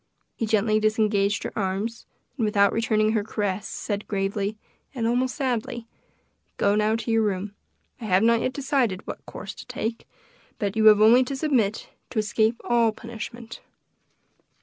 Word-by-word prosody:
He 225 Hz, -, -2 dB
gently 215 Hz, 0 st, +2 dB
disengaged 215 Hz, -2 st, +1 dB
her -, -, -5 dB
arms, 205 Hz, +3 st, -3 dB, 0.3 s
and 250 Hz, -, -2 dB
without 205 Hz, -2 st, +3 dB
returning 215 Hz, -1 st, +2 dB
her 220 Hz, -2 st, +1 dB
caress, 205 Hz, -1 st, -2 dB
said 205 Hz, -1 st, -4 dB
gravely, 200 Hz, +1 st, -2 dB, 0.4 s
and 235 Hz, -3 st, -1 dB
almost 245 Hz, +2 st, +1 dB
sadly, 240 Hz, -4 st, -2 dB, 0.7 s
"Go 200 Hz, -, +3 dB
now 215 Hz, +1 st, +2 dB
to 230 Hz, +1 st, -3 dB
your 225 Hz, 0 st, +3 dB
room. 200 Hz, -1 st, -2 dB, 0.5 s
I -, -, -5 dB
have 190 Hz, 0 st, +3 dB
not 230 Hz, 0 st, +4 dB
yet 255 Hz, -, 0 dB
decided 260 Hz, -8 st, -1 dB
what -, -, -7 dB
course -, -, -7 dB
to -, -, -12 dB
take, 230 Hz, +1 st, -4 dB, 0.5 s
but 200 Hz, 0 st, -2 dB
you 220 Hz, 0 st, +2 dB
have 210 Hz, -1 st, +7 dB
only 235 Hz, +4 st, +7 dB
to 275 Hz, -, -4 dB
submit, 255 Hz, -8 st, 0 dB, 0.2 s
to -, -, -8 dB
escape 220 Hz, +1 st, +1 dB
all 235 Hz, -2 st, +3 dB
punishment." 230 Hz, +1 st, -8 dB
220 Hz, 160 wpm, -25 LUFS, 205-230 Hz, 0.7 s, have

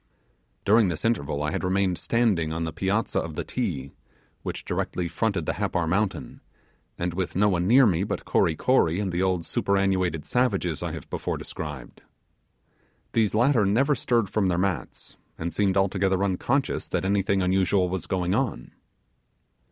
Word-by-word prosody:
During 110 Hz, +1 st, +5 dB
this 85 Hz, +1 st, -3 dB
interval 75 Hz, -10 st, 0 dB
I 75 Hz, -, -1 dB
had -, -, -3 dB
remained 95 Hz, 0 st, +1 dB
standing 105 Hz, -10 st, +1 dB
on 85 Hz, +1 st, -2 dB
the 80 Hz, -1 st, -4 dB
piazza 100 Hz, +4 st, 0 dB
of 80 Hz, -2 st, -5 dB
the -, -, -2 dB
'Ti,' 80 Hz, -, -3 dB, 0.5 s
which -, -, -5 dB
directly 90 Hz, -1 st, -2 dB
fronted 95 Hz, -1 st, -1 dB
the -, -, -1 dB
Happar 85 Hz, -, -1 dB
mountain, 95 Hz, +4 st, -1 dB, 0.6 s
and 85 Hz, 0 st, -2 dB
with 95 Hz, 0 st, -3 dB
no 105 Hz, +3 st, +4 dB
one 90 Hz, -2 st, 0 dB
near 130 Hz, +5 st, +7 dB
me 90 Hz, -4 st, +2 dB
but -, -, -4 dB
Kory 80 Hz, -, +2 dB
Kory 90 Hz, -6 st, +2 dB
and 100 Hz, -3 st, -1 dB
the 90 Hz, +1 st, -1 dB
old 95 Hz, -3 st, 0 dB
superannuated 95 Hz, -5 st, 0 dB
savages 100 Hz, -10 st, 0 dB
I -, -, -3 dB
have -, -, -8 dB
described. 75 Hz, -6 st, -5 dB, 1.1 s
These 110 Hz, -2 st, +1 dB
latter 120 Hz, 0 st, +4 dB
never 120 Hz, +9 st, +3 dB
stirred 120 Hz, -4 st, +1 dB
from 100 Hz, 0 st, 0 dB
their 90 Hz, -2 st, +1 dB
mats, 95 Hz, -1 st, -3 dB, 0.2 s
and 85 Hz, +1 st, -4 dB
seemed 100 Hz, -2 st, +1 dB
altogether 95 Hz, 0 st, +1 dB
unconscious 120 Hz, +8 st, 0 dB
that 90 Hz, -, -2 dB
anything 100 Hz, -1 st, +1 dB
unusual 95 Hz, 0 st, +2 dB
was 90 Hz, -2 st, -4 dB
going 90 Hz, -2 st, 0 dB
on. 120 Hz, +1 st, -2 dB
95 Hz, 160 wpm, -25 LUFS, 85-105 Hz, 1.1 s, near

